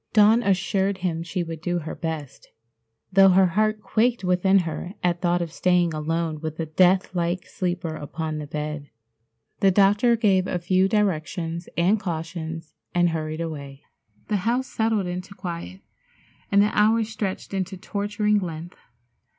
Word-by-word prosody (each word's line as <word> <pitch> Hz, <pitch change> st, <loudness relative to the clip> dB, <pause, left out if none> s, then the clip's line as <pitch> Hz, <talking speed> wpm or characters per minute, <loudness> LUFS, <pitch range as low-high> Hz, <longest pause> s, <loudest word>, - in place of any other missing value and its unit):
Dawn 215 Hz, +2 st, +6 dB
assured 195 Hz, -1 st, +1 dB
him 170 Hz, -3 st, -1 dB
she 175 Hz, +1 st, -3 dB
would 165 Hz, -2 st, -7 dB
do 175 Hz, 0 st, -1 dB
her 160 Hz, -2 st, -5 dB
best, 155 Hz, -5 st, -6 dB, 0.7 s
though 195 Hz, 0 st, +7 dB
her 190 Hz, +1 st, +5 dB
heart 215 Hz, +4 st, +1 dB
quaked 235 Hz, +1 st, +1 dB
within 180 Hz, +2 st, +3 dB
her 175 Hz, +4 st, -5 dB
at 175 Hz, -1 st, +1 dB
thought 175 Hz, -1 st, +1 dB
of 165 Hz, -, -7 dB
staying 180 Hz, -1 st, +2 dB
alone 155 Hz, 0 st, -2 dB
with 155 Hz, -1 st, -5 dB
the 165 Hz, -, -2 dB
death 185 Hz, +4 st, +3 dB
like 175 Hz, 0 st, -1 dB
sleeper 175 Hz, -3 st, -3 dB
upon 155 Hz, +1 st, -4 dB
the 150 Hz, -, -6 dB
bed. 150 Hz, -1 st, -5 dB, 0.7 s
The 195 Hz, -, +5 dB
doctor 205 Hz, +5 st, +4 dB
gave 195 Hz, -5 st, +2 dB
a -, -, -1 dB
few 185 Hz, +2 st, +2 dB
directions 170 Hz, -4 st, -1 dB
and 185 Hz, +6 st, +3 dB
cautions, 165 Hz, -2 st, -5 dB, 0.2 s
and 175 Hz, 0 st, +4 dB
hurried 155 Hz, 0 st, -3 dB
away. 140 Hz, -4 st, -6 dB, 0.4 s
The 210 Hz, -, +1 dB
house 235 Hz, +7 st, 0 dB
settled 220 Hz, -5 st, 0 dB
into 180 Hz, +3 st, -5 dB
quiet, 170 Hz, -, -6 dB, 0.7 s
and 200 Hz, 0 st, +6 dB
the 210 Hz, -, 0 dB
hours 220 Hz, +1 st, +3 dB
stretched 205 Hz, -3 st, -4 dB
into 190 Hz, 0 st, -3 dB
torturing 205 Hz, +1 st, 0 dB
length. 170 Hz, -1 st, -7 dB
180 Hz, 155 wpm, -24 LUFS, 165-200 Hz, 0.7 s, though